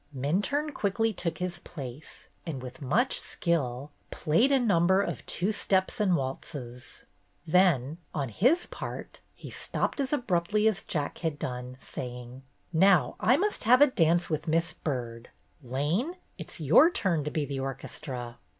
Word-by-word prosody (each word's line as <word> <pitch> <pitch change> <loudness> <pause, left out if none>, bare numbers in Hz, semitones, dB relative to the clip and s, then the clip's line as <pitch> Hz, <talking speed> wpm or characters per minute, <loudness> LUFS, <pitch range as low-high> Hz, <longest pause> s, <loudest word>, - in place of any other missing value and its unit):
Minturne 205 - 0
quickly 220 +1 0
took 170 -4 -3
his 180 -1 -3
place 140 -4 -9 0.2
and, 160 -6 -5
with 130 +1 -9
much 225 - +2
skill, 145 -6 -2 0.2
played 170 - +2
a 275 - +5
number 190 -5 +3
of 200 - -2
two 190 +5 0
steps 190 -2 0
and 195 -4 +3
waltzes. 130 -3 -6 0.4
Then, 160 -4 +3
on 140 -4 -2
his 255 - +2
part, - - -7 0.2
he - - -10
stopped - - -2
as 270 -2 0
abruptly 210 - +1
as 215 -4 +1
Jack 150 -4 -3
had 160 -3 -2
done, 125 -1 -5
saying: 125 0 -7 0.3
"Now 170 -6 +4
I 250 +5 +4
must 410 - -1
have 250 +3 +6
a 290 - +9
dance 175 - +2
with 155 0 -3
Miss 165 +1 +1
Byrd. 120 -5 -5 0.3
Lane, 150 - -1 0.2
it's 165 -1 -9
your 165 - +6
turn 180 - 0
to 150 - -2
be 150 -1 -1
the 140 -1 -4
orchestra." 130 -2 -6
165 Hz, 150 wpm, -28 LUFS, 135-205 Hz, 0.4 s, a